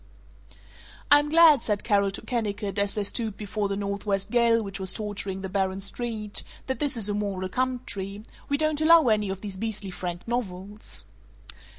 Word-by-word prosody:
"I'm 290 0 +6
glad," 320 -4 +7
said 210 -3 -1
Carol 200 -3 +3
to 195 - -8
Kennicott 210 -4 -2
as 200 0 +2
they 210 - 0
stooped 215 0 -1
before 210 0 -2
the 200 - -1
northwest 200 0 -2
gale 235 -2 +4
which 195 -1 -6
was 190 -1 0
torturing 205 -3 -4
the 190 - -4
barren 190 0 -1
street, 215 +1 -2 0.2
"that 260 - -2
this 285 -4 0
is 215 -3 +3
a 205 - 0
moral 200 -3 -2
country. 215 -5 -3 0.3
We 285 - +2
don't 310 0 +1
allow 320 -4 +6
any 210 -2 +2
of 190 0 -4
these 200 -3 -6
beastly 210 -2 -4
frank 175 0 -5
novels." 205 -3 -4
210 Hz, 175 wpm, -26 LUFS, 195-235 Hz, 0.3 s, glad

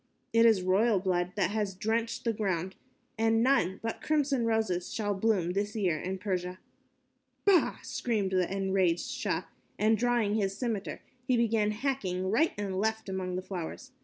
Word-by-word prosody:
It 230 0 +6
is 210 -5 +4
royal 200 +3 +3
blood 180 -1 0
that 195 -2 +1
has 205 -3 -1
drenched 230 +4 -1
the 230 - +1
ground, 190 -3 -2 0.4
and 225 0 +3
none 190 -9 +2
but 225 - -3
crimson 280 -6 +1
roses 220 -6 0
shall 205 -2 -1
bloom 195 -4 +1
this 205 +3 -2
year 180 -8 +1
in 190 +3 -3
Persia." 185 -2 -3 0.9
"Bah!" 390 -4 +4
screamed 210 -6 -1
the 185 -1 +1
enraged 190 -3 +1
Shah - - -2 0.3
and, 220 +1 +3
drawing 235 -3 +1
his 195 -2 0
scimitar, 225 -6 -3 0.3
he 255 -2 +3
began 225 -2 +2
hacking 210 -6 -2
right 315 +10 +3
and 195 -2 -2
left 220 0 -1
among 185 -1 -3
the 185 - -3
flowers. 190 +8 -6
205 Hz, 160 wpm, -30 LUFS, 185-225 Hz, 0.9 s, It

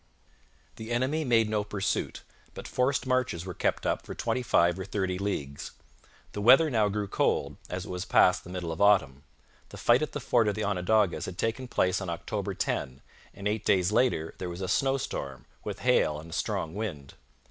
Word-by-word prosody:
The 110 0 -8
enemy 130 +6 0
made 115 -5 +3
no 105 -1 0
pursuit, 105 -1 -2 0.3
but - - -7
forced 130 +1 0
marches 130 -9 0
were 90 - -5
kept - - -1
up - - 0
for - - -8
twenty 125 - -1
five 85 -6 +2
or - - -3
thirty 95 -2 -2
leagues. 70 -9 -4 0.6
The 105 - -5
weather 135 +8 +6
now 110 -4 +2
grew 105 0 -2
cold, 70 -6 0
as 90 +1 -4
it - - -7
was 90 0 -3
past 90 -1 +4
the - - -12
middle 90 -2 -4
of 80 - -5
autumn. 70 -10 +4 0.5
The - - -10
fight 120 +2 +4
at 155 - -3
the 145 - -3
fort 115 -3 +2
of 105 - 0
the 110 - -2
Onondagas 100 0 +1
had 90 - -7
taken 115 +3 -2
place 95 -4 +1
on 95 - -4
October 100 +3 -4
10, 65 -5 -2 0.3
and 100 - -3
eight 105 0 -1
days 95 -2 +2
later 110 -9 +1
there 90 - -4
was 85 +2 -7
a 95 - -2
snowstorm, 125 - -1 0.2
with - - -6
hail 75 0 +2
and 80 +2 -11
a - - -7
strong 80 - -2
wind. 90 -10 -5
100 Hz, 200 wpm, -28 LUFS, 90-115 Hz, 0.6 s, weather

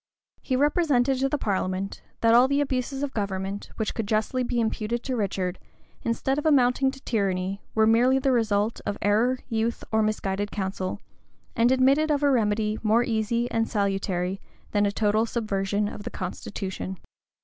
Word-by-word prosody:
He 260 - -1
represented 275 -3 +2
to 270 +1 +1
the 295 - 0
parliament, 195 -3 -2 0.2
that 230 0 +5
all 245 +2 +7
the 280 +1 +1
abuses 270 0 -1
of 280 - -3
government 195 -1 -3
which 220 -2 -2
could 225 -3 -3
justly 220 +4 0
be 240 -1 -1
imputed 230 +1 -1
to 260 - -2
Richard, 190 -4 -2 0.4
instead 265 +4 0
of 295 - -6
amounting 265 -2 +4
to 270 0 -8
tyranny, 195 -4 -1
were 220 0 +4
merely 240 +4 +4
the 270 0 +1
result 220 -2 +1
of 205 - -3
error, 225 +6 +3
youth, 225 +1 -1
or 220 0 +3
misguided 205 -2 -1
counsel, 190 -2 -3 0.6
and 235 +2 +4
admitted 270 +4 +4
of 295 -1 +1
a 285 - +4
remedy 215 -3 +1
more 225 +2 +3
easy 230 +1 0
and 225 0 0
salutary 195 -2 -1 0.3
than 205 -1 +2
a - - 0
total 215 +1 +1
subversion 205 -2 -1
of 205 - -7
the 225 - -5
constitution. 190 -1 -5
220 Hz, 170 wpm, -26 LUFS, 200-255 Hz, 0.6 s, all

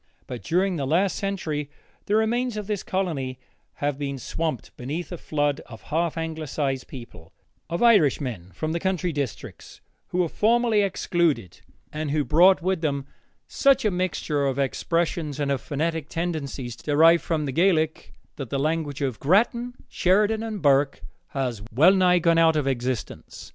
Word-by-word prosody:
But 125 -2 -7
during 180 +2 +1
the 140 -3 -2
last 175 +5 +2
century 160 -8 -3 0.4
the 205 - +2
remains 230 +2 +1
of 210 - -4
this 210 -2 -2
colony 150 -9 -2 0.4
have 145 -1 -2
been 140 -1 -3
swamped 155 +2 -4
beneath 150 +9 -5
a 175 - -4
flood 145 -2 -1
of 115 -4 -12
half 165 0 0
Anglicized 155 -4 -3
people, 115 -11 -11 0.4
of 170 +6 -1
Irishmen 140 - +3
from 155 - -3
the 170 - -1
country 185 -1 -1
districts, 140 -5 -6 0.3
who - - -4
were 180 -2 +2
formerly 225 +3 +2
excluded, 170 - 0 0.3
and 155 0 -3
who 150 +1 +1
brought 175 +5 +5
with 185 -2 0
them 140 -4 -1 0.4
such 275 -5 +3
a 210 - +3
mixture 165 -5 -1
of 135 -1 -1
expressions 155 +1 -1
and 140 -1 0
of 135 -4 -1
phonetic 160 +2 -2
tendencies 145 -8 -4
derived 160 +5 +4
from 155 -3 -1
the 135 - -2
Gaelic 160 0 +1 0.2
that 135 -5 -6
the 140 - -1
language 150 -1 -1
of 130 -5 -2
Grattan, 235 - +2
Sheridan, 210 +4 +2
and 220 -5 -5
Burke 140 -1 +3 0.2
has 125 -6 -3
well 155 - +6
nigh 180 -2 +4
gone 165 -1 +3
out 165 -1 +5
of 150 -3 0
existence. 130 -2 -4
160 Hz, 160 wpm, -25 LUFS, 140-185 Hz, 0.4 s, well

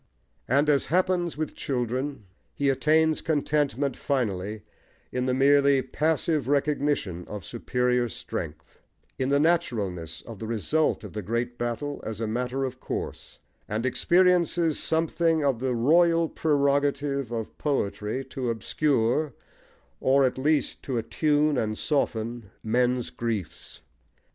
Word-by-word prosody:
And 140 +4 +3
as 145 -2 +3
happens 180 -1 +1
with 155 -1 -3
children 130 0 -3 0.3
he 140 -1 +1
attains 155 +4 +3
contentment 145 -3 0
finally 105 -6 -2 0.5
in 125 0 -1
the 130 - +2
merely 140 0 +4
passive 155 0 0
recognition 140 - 0
of 105 -3 -7
superior 125 0 0
strength, 80 -4 -7 0.4
in 130 0 0
the 140 0 +3
naturalness 100 - 0
of 115 -4 -10
the 110 - -5
result 135 +8 0
of - - -9
the 105 - -3
great 120 +4 -3
battle 120 +5 -3
as 110 -1 -5
a 115 - -1
matter 125 +4 -2
of 130 0 -6
course, - - -6 0.3
and 110 +3 -2
experiences 170 +3 +3
something 165 0 +1
of 135 -5 +1
the 130 -1 -1
royal 165 +6 +4
prerogative 140 -3 +1
of 115 -2 -4
poetry 130 -2 -1
to 130 -2 -4
obscure, 125 +4 +1 0.7
or 135 +1 +4
at 130 0 -1
least 145 0 +1
to 130 -3 -3
attune 145 +5 +1
and 110 -1 -1
soften 115 -6 -1
men's 125 +2 +1
griefs. 110 -7 -4
135 Hz, 130 wpm, -26 LUFS, 115-150 Hz, 0.7 s, merely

